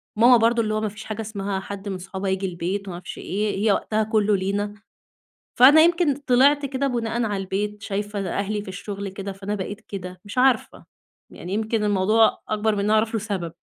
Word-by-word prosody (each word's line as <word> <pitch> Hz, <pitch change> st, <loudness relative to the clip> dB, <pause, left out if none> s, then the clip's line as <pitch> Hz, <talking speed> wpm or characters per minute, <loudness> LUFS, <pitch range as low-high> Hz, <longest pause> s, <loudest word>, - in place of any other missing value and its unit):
ماما 240 Hz, +3 st, +7 dB
برضو 230 Hz, +1 st, +3 dB
اللي 215 Hz, -1 st, -1 dB
هو 215 Hz, -, 0 dB
ما 215 Hz, -, -1 dB
فيش 210 Hz, +2 st, -10 dB
حاجة 220 Hz, 0 st, -5 dB
اسمها 200 Hz, -2 st, -3 dB
حد 200 Hz, +1 st, -7 dB
من 190 Hz, -, -3 dB
صحابها 190 Hz, +1 st, -5 dB
ييجي 190 Hz, +1 st, -1 dB
البيت 185 Hz, +3 st, -3 dB
وما 175 Hz, -, -5 dB
عرفش 175 Hz, 0 st, -8 dB
إيه 205 Hz, +2 st, -2 dB
،هي 210 Hz, -, +5 dB
وقتها 215 Hz, +2 st, 0 dB
كلّه 215 Hz, -1 st, +2 dB
لينا. 200 Hz, +2 st, -2 dB, 0.9 s
فأنا 290 Hz, +5 st, +9 dB
يمكن 340 Hz, -3 st, +3 dB
طلعت 280 Hz, +1 st, +3 dB
كده 275 Hz, +1 st, -1 dB
بُناءً 235 Hz, -1 st, -1 dB
على 205 Hz, -3 st, -1 dB
البيت، 205 Hz, +2 st, -3 dB
شايفة 205 Hz, +1 st, -3 dB
أهلي 205 Hz, +1 st, -2 dB
في 205 Hz, -, -12 dB
الشغل 200 Hz, +1 st, -6 dB
كده، 195 Hz, +1 st, -6 dB
فأنا 195 Hz, +2 st, -4 dB
بقيت 205 Hz, +2 st, -5 dB
كده 185 Hz, -2 st, -8 dB
مش 205 Hz, +4 st, -9 dB
عارفة، 255 Hz, -3 st, +2 dB, 0.4 s
يعني 180 Hz, +3 st, -7 dB
يمكن 220 Hz, 0 st, 0 dB
الموضوع 210 Hz, +2 st, +3 dB
أكبر 215 Hz, 0 st, +1 dB
من 200 Hz, -, -2 dB
إن 200 Hz, -, 0 dB
أنا 215 Hz, -, +2 dB
أعرف 220 Hz, +1 st, +2 dB
له 225 Hz, -, +1 dB
سبب. 190 Hz, -6 st, -4 dB
210 Hz, 205 wpm, -23 LUFS, 195-225 Hz, 0.9 s, فأنا